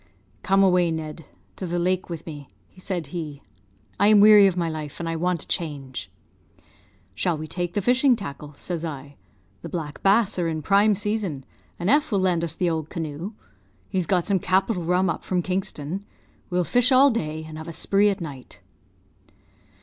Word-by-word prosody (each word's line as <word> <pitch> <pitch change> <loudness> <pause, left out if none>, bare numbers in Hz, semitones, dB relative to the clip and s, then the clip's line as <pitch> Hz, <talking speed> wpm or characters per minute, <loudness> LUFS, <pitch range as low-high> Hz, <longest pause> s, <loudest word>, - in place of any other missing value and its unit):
"'Come 195 +1 +3
away, 180 -2 +4
Ned, 160 -1 -5 0.3
to 185 - -4
the 175 +1 -2
lake, 185 +1 0
with 165 -2 -6
me,' 145 -4 -8 0.3
said 185 -2 -4
he; 150 -5 -5 0.6
'I 200 - +5
am 210 -1 +7
weary 210 -1 +8
of 185 -2 -1
my 170 -1 0
life, 155 -3 -6
and 170 - -3
I 165 - -2
want 175 0 -1
a - - -14
change.' 145 -7 -4 1.0
"'Shall 175 -3 0
we 155 - -5
take 175 +1 -4
the 205 - 0
fishing 250 +3 +4
tackle?' 150 -7 -8
says 170 -3 -5
I. 145 -3 -6 0.5
'The - - -7
black 155 -4 -5
bass 200 0 +3
are 170 - +1
in 160 -2 -3
prime 200 +4 +4
season, 200 -9 -2 0.3
and 175 - -3
F 295 +4 +3
will 205 - +2
lend 180 -3 +1
us 165 -1 -3
the 180 - 0
old 160 -2 -2
canoe. 165 +4 -5 0.6
He's 185 -4 -1
got 180 -3 +1
some 200 -2 +1
capital 185 +1 +1
rum 180 +3 +2
up 165 - -2
from 180 -2 -1
Kingston. 185 -1 -3 0.5
We'll 180 -1 +1
fish 245 +7 +3
all 265 +2 +6
day, 160 -8 -3
and 155 0 -8
have 160 - -8
a - - -5
spree 200 +5 +2
at 200 0 -2
night.' 140 -6 -9
175 Hz, 190 wpm, -24 LUFS, 160-195 Hz, 1.0 s, weary